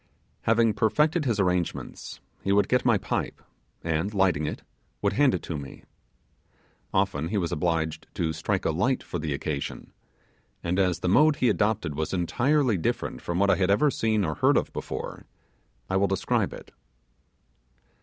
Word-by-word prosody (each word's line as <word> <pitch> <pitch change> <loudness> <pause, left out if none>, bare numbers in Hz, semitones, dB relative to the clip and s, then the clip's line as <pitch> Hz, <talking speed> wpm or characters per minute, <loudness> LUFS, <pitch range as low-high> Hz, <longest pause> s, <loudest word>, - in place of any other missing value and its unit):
Having 115 -1 +4
perfected 150 - +2
his 115 -5 0
arrangements, 90 -3 -2 0.2
he 100 - 0
would 100 +1 +4
get 125 - +2
my 120 -4 +4
pipe, - - -3 0.4
and, 80 +4 -1
lighting 90 -6 +2
it, - - -5 0.4
would 100 +8 0
hand 135 -3 +4
it 90 - -5
to 80 -4 -4
me. 70 -1 -10 1.1
Often 95 -6 0
he 105 - -1
was 85 -4 -1
obliged 80 -1 -1
to 80 -2 -1
strike 95 +5 -2
a - - +2
light 110 +12 0
for 90 - -5
the 75 -1 -3
occasion, 70 0 -4 0.7
and 90 +2 0
as 90 -3 +1
the - - -1
mode 150 +11 +5
he 125 -3 +2
adopted 105 -7 0
was 80 +5 -2
entirely 120 - +2
different 80 - -2
from 85 - -3
what 100 +1 +4
I - - +3
had 95 -1 +1
ever 140 +9 +4
seen 110 -5 +1
or 80 - -1
heard - - +3
of - - -1
before - - -6 0.6
I 95 - 0
will 100 +1 +3
describe 95 0 0
it. - - -11
95 Hz, 170 wpm, -26 LUFS, 80-110 Hz, 1.1 s, mode